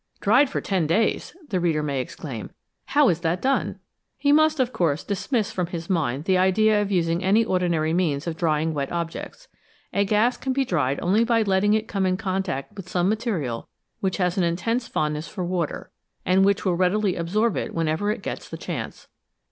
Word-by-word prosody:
" -, -, -38 dB
Dried 255 Hz, +7 st, +4 dB
for -, -, -2 dB
ten 185 Hz, -6 st, 0 dB
days! 215 Hz, -, 0 dB
" 310 Hz, -, -21 dB
the 185 Hz, -, +1 dB
reader 165 Hz, -3 st, +1 dB
may 140 Hz, -3 st, -1 dB
exclaim; -, -, -7 dB, 0.2 s
" -, -, -53 dB
how 290 Hz, -2 st, +6 dB
is 170 Hz, -, +1 dB
that 170 Hz, +1 st, 0 dB
done? 270 Hz, +5 st, 0 dB, 0.2 s
" -, -, -55 dB
He 285 Hz, -, +2 dB
must, 310 Hz, 0 st, +4 dB
of 255 Hz, 0 st, +1 dB
course, 160 Hz, -3 st, 0 dB
dismiss 215 Hz, +2 st, -1 dB
from 180 Hz, -5 st, -2 dB
his 170 Hz, 0 st, -5 dB
mind 145 Hz, -6 st, 0 dB
the 185 Hz, -1 st, +3 dB
idea 210 Hz, +3 st, +3 dB
of 205 Hz, -1 st, -2 dB
using 170 Hz, -1 st, +1 dB
any 210 Hz, +4 st, +4 dB
ordinary 170 Hz, -5 st, +1 dB
methods 160 Hz, -5 st, 0 dB
of 170 Hz, -2 st, -3 dB
drying 160 Hz, -1 st, 0 dB
wet 140 Hz, -2 st, -3 dB
objects. 170 Hz, -, -5 dB, 0.5 s
A 200 Hz, -, +3 dB
gas 215 Hz, +5 st, +2 dB
can 265 Hz, -, -2 dB
be 270 Hz, 0 st, +1 dB
dried 145 Hz, -, 0 dB
only 200 Hz, +6 st, +3 dB
by 230 Hz, -1 st, +2 dB
letting 205 Hz, +1 st, +2 dB
it 220 Hz, 0 st, -1 dB
come 195 Hz, -3 st, 0 dB
in 185 Hz, 0 st, +1 dB
contact 190 Hz, -5 st, -3 dB
with 190 Hz, -4 st, -9 dB
some 180 Hz, +1 st, +1 dB
material 200 Hz, -, -2 dB, 0.3 s
which 190 Hz, -1 st, -1 dB
has 180 Hz, -1 st, 0 dB
an -, -, +3 dB
intense 225 Hz, +9 st, -1 dB
fond 150 Hz, 0 st, -1 dB
ness 150 Hz, +2 st, -5 dB
for 185 Hz, -, -4 dB
water, 175 Hz, -3 st, -3 dB, 0.3 s
and 185 Hz, +2 st, +4 dB
which 200 Hz, +1 st, +2 dB
will 185 Hz, -, +2 dB
readily 185 Hz, +2 st, +1 dB
absorb 200 Hz, +6 st, 0 dB
it -, -, -3 dB
when 165 Hz, -1 st, 0 dB
ever 160 Hz, +7 st, 0 dB
it 215 Hz, -, -2 dB
gets -, -, -5 dB
the -, -, -6 dB
chance. -, -, -6 dB
185 Hz, 215 wpm, -24 LUFS, 165-215 Hz, 0.5 s, how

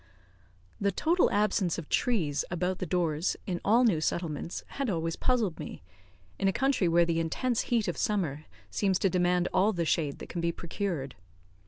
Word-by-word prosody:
The 200 Hz, 0 st, +1 dB
total 335 Hz, -, +2 dB
absence 200 Hz, -4 st, +1 dB
of 165 Hz, -4 st, -6 dB
trees 165 Hz, -, +1 dB
about 180 Hz, +1 st, -1 dB
the 185 Hz, -, -3 dB
doors 165 Hz, -1 st, 0 dB
in 180 Hz, -3 st, -3 dB
all 230 Hz, +4 st, +4 dB
new 190 Hz, -10 st, +3 dB
settlements 165 Hz, 0 st, -2 dB
had 275 Hz, -3 st, -2 dB
always 165 Hz, -3 st, -1 dB
puzzled 230 Hz, -9 st, 0 dB
me, 150 Hz, -, -7 dB, 0.6 s
in 195 Hz, -, +2 dB
a -, -, +4 dB
country 265 Hz, -4 st, +1 dB
where 170 Hz, +1 st, +4 dB
the 165 Hz, -1 st, 0 dB
intense 230 Hz, +9 st, 0 dB
heat 230 Hz, -3 st, +2 dB
of -, -, -2 dB
summer 155 Hz, -8 st, -1 dB, 0.3 s
seems 195 Hz, -3 st, +1 dB
to 195 Hz, -, +1 dB
demand 180 Hz, -1 st, +2 dB
all 195 Hz, +4 st, +3 dB
the 170 Hz, -3 st, -1 dB
shade 155 Hz, -3 st, 0 dB
that -, -, -9 dB
can 175 Hz, -, -3 dB
be 170 Hz, 0 st, +1 dB
procured. 170 Hz, -6 st, -4 dB
180 Hz, 180 wpm, -29 LUFS, 165-205 Hz, 0.6 s, all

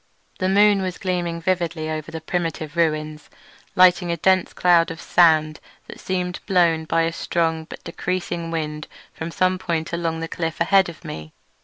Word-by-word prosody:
The 185 Hz, -, +1 dB
moon 205 Hz, 0 st, +4 dB
was 185 Hz, -1 st, -3 dB
gleaming 175 Hz, -3 st, -2 dB
vividly 170 Hz, -2 st, -1 dB
over 155 Hz, -1 st, -4 dB
the 160 Hz, -, -6 dB
primeval 165 Hz, -1 st, -3 dB
ruins, 155 Hz, -2 st, -1 dB, 0.5 s
lighting 180 Hz, -1 st, +5 dB
a 170 Hz, -, -1 dB
dense 185 Hz, +2 st, +2 dB
cloud 175 Hz, -2 st, +3 dB
of 165 Hz, 0 st, -7 dB
sand 155 Hz, -3 st, +3 dB, 0.3 s
that -, -, -11 dB
seemed 180 Hz, -1 st, -3 dB
blown 170 Hz, -5 st, +2 dB
by 165 Hz, +1 st, +1 dB
a 165 Hz, 0 st, -1 dB
strong 165 Hz, -2 st, -1 dB
but -, -, -11 dB
decreasing 175 Hz, -2 st, -3 dB
wind 155 Hz, -2 st, -4 dB, 0.3 s
from 160 Hz, -, -6 dB
some 185 Hz, +2 st, +1 dB
point 170 Hz, -2 st, -3 dB
along 165 Hz, -1 st, -2 dB
the 165 Hz, -, -4 dB
cliff 165 Hz, -1 st, -4 dB
ahead 190 Hz, +2 st, +4 dB
of 170 Hz, -, -12 dB
me. 80 Hz, 0 st, -8 dB
170 Hz, 170 wpm, -22 LUFS, 160-180 Hz, 0.5 s, lighting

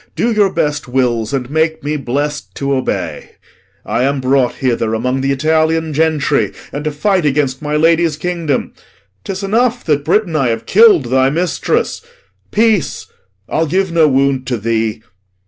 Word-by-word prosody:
Do 235 Hz, -, +1 dB
your 205 Hz, -3 st, +2 dB
best 150 Hz, -3 st, -1 dB
wills, 120 Hz, -3 st, 0 dB
And 130 Hz, -3 st, -2 dB
make 160 Hz, +1 st, 0 dB
me 150 Hz, +1 st, -2 dB
blest 145 Hz, +2 st, -3 dB
to 140 Hz, 0 st, -1 dB
obey. 130 Hz, -1 st, -3 dB, 0.5 s
I -, -, -1 dB
am 140 Hz, +2 st, +1 dB
brought 130 Hz, -1 st, +1 dB
hither 115 Hz, -3 st, -1 dB
Among 125 Hz, +4 st, -1 dB
th' -, -, -3 dB
Italian 160 Hz, +3 st, +1 dB
gentry, 155 Hz, -1 st, +1 dB, 0.2 s
and 145 Hz, -, -4 dB
to 155 Hz, -, 0 dB
fight 185 Hz, +5 st, +1 dB
Against 140 Hz, -2 st, 0 dB
my 150 Hz, 0 st, -2 dB
lady's 165 Hz, 0 st, +2 dB
kingdom. 165 Hz, -4 st, -2 dB, 0.5 s
'Tis 195 Hz, 0 st, -5 dB
enough 240 Hz, +4 st, +1 dB
That, 145 Hz, -3 st, +1 dB
Britain, 175 Hz, +2 st, +1 dB
I 135 Hz, -4 st, +2 dB
have 115 Hz, -1 st, -2 dB
kill'd 205 Hz, -, +5 dB
thy 130 Hz, 0 st, +3 dB
mistress; 170 Hz, +5 st, -1 dB, 0.5 s
peace! 215 Hz, -6 st, +1 dB, 0.4 s
I'll 160 Hz, +1 st, 0 dB
give 190 Hz, +3 st, 0 dB
no 165 Hz, -2 st, +4 dB
wound 135 Hz, -1 st, +1 dB
to 125 Hz, -2 st, -1 dB
thee. 110 Hz, 0 st, -2 dB
150 Hz, 160 wpm, -15 LUFS, 130-165 Hz, 0.5 s, kill'd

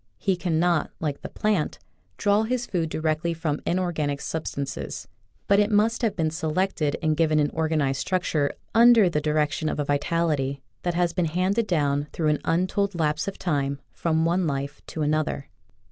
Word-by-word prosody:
He 195 Hz, -2 st, +1 dB
cannot, 170 Hz, -2 st, +1 dB
like 150 Hz, -3 st, -3 dB
the -, -, -6 dB
plant, 210 Hz, -7 st, 0 dB, 0.4 s
draw 205 Hz, +1 st, +3 dB
his 245 Hz, +2 st, -1 dB
food 170 Hz, -6 st, -1 dB
directly 160 Hz, +2 st, -1 dB
from 155 Hz, -3 st, -2 dB
inorganic 165 Hz, -6 st, 0 dB
sub 160 Hz, +2 st, -4 dB
stances, 140 Hz, -1 st, -5 dB, 0.4 s
but 200 Hz, 0 st, +5 dB
it 210 Hz, 0 st, +3 dB
must 220 Hz, +3 st, +2 dB
have 220 Hz, -4 st, +1 dB
been 160 Hz, -4 st, 0 dB
selected 160 Hz, -1 st, -1 dB
and 155 Hz, -1 st, +2 dB
given 155 Hz, -1 st, +2 dB
an 145 Hz, -1 st, +2 dB
organized 155 Hz, -4 st, 0 dB
structure 165 Hz, -6 st, 0 dB, 0.2 s
under 230 Hz, -4 st, +6 dB
the 150 Hz, -, 0 dB
direc 150 Hz, -1 st, +1 dB
tion 155 Hz, 0 st, -2 dB
of -, -, -3 dB
a 145 Hz, -, 0 dB
vitality 145 Hz, -2 st, 0 dB, 0.2 s
that 175 Hz, -1 st, -1 dB
has 175 Hz, -1 st, +1 dB
been 180 Hz, -1 st, +1 dB
handed 185 Hz, +7 st, 0 dB
down, 145 Hz, -4 st, +1 dB
through 155 Hz, -2 st, +1 dB
an 150 Hz, -, +1 dB
untold 185 Hz, +3 st, 0 dB
lapse 155 Hz, +2 st, 0 dB
of 195 Hz, -, -4 dB
time, 140 Hz, -5 st, -1 dB
from 160 Hz, -1 st, 0 dB
one 175 Hz, +1 st, +1 dB
life 140 Hz, -1 st, -3 dB
to 155 Hz, -, -3 dB
another. 150 Hz, -2 st, -1 dB
160 Hz, 175 wpm, -25 LUFS, 150-185 Hz, 0.4 s, under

